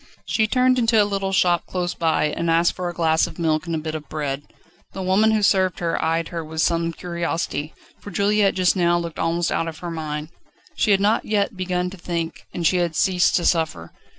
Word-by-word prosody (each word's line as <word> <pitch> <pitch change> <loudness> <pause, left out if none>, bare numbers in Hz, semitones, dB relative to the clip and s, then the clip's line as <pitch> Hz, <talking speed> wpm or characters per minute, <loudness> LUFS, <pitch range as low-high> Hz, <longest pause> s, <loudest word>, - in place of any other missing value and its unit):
She 220 -1 +1
turned 255 +2 +3
into 230 -2 +3
a 205 - +5
little 195 -1 -2
shop 175 -2 +2
close 180 -1 -2
by, 160 -2 +1
and 165 +2 -2
asked 165 +1 +3
for 180 -1 -4
a - - -6
glass 160 0 +2
of 165 - -11
milk 160 0 0
and 165 - -1
a - - 0
bit 155 0 -4
of 150 -2 -7
bread. 145 -2 -3 0.5
The 190 - -5
woman 195 +4 +3
who 215 -1 +1
served 190 -3 +3
her 170 -1 -1
eyed 165 +1 0
her 170 -2 -4
with 160 +1 -2
some 170 -1 +1
curiosity, 170 -3 -3 0.2
for - - -10
Juliette 200 0 +2
just 185 0 +3
now 175 -2 +3
looked 170 -2 -5
almost 165 +1 0
out 165 - 0
of 160 -1 -6
her 175 0 -6
mind. 155 -1 -4 0.5
She - - +1
had 195 -1 +4
not 210 +3 +2
yet 210 +1 0
begun 180 -1 -2
to 195 - -10
think, 170 -1 -4
and 175 - -4
she 180 - +3
had 170 -2 0
ceased 180 0 +2
to 175 - +1
suffer. 155 - 0
175 Hz, 225 wpm, -22 LUFS, 165-190 Hz, 0.5 s, a